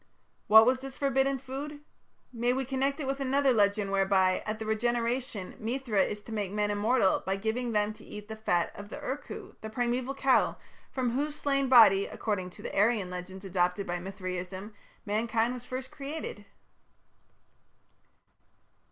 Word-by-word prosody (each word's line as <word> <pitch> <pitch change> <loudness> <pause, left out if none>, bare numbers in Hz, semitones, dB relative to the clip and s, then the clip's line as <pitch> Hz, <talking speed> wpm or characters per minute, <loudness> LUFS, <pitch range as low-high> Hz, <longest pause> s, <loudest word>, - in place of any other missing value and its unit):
What 220 +1 +9
was 255 +1 +3
this 270 0 -8
forbidden 275 0 +2
food? 280 +3 -7 0.5
May 240 +1 +1
we 265 +1 -1
connect 270 +2 0
it 295 - -2
with 270 +1 -2
another 270 0 +3
legend 200 -2 +2
whereby, 190 -1 +3
at 215 +1 -2
the 220 - -5
Regeneration, 235 -1 -1
Mithra 230 -2 0
is 210 +2 -1
to 225 - -12
make 205 -4 -2
men 210 0 0
immortal 205 0 +2
by 190 - 0
giving 225 +4 -2
them 210 -1 +1
to - - -16
eat 210 0 -9
the 220 - -6
fat 175 -6 0
of 205 0 -10
the - - -7
Ur 265 - -3
Kuh, - - -10
the 220 - -6
primeval 245 +3 -1
cow 270 -1 +3 0.3
from 255 -3 -1
whose 290 +4 -1
slain 275 -2 0
body, 205 -6 +7
according 195 -5 -3
to - - -13
the - - -5
Aryan 205 -2 +2
legends 185 +2 -7
adopted 180 +1 0
by 175 0 -2
Mithraism, 185 +1 -6 0.3
mankind 225 +2 +1
was 250 -1 -8
first 255 +1 -5
created?" 315 +12 -6
225 Hz, 165 wpm, -29 LUFS, 200-260 Hz, 0.5 s, What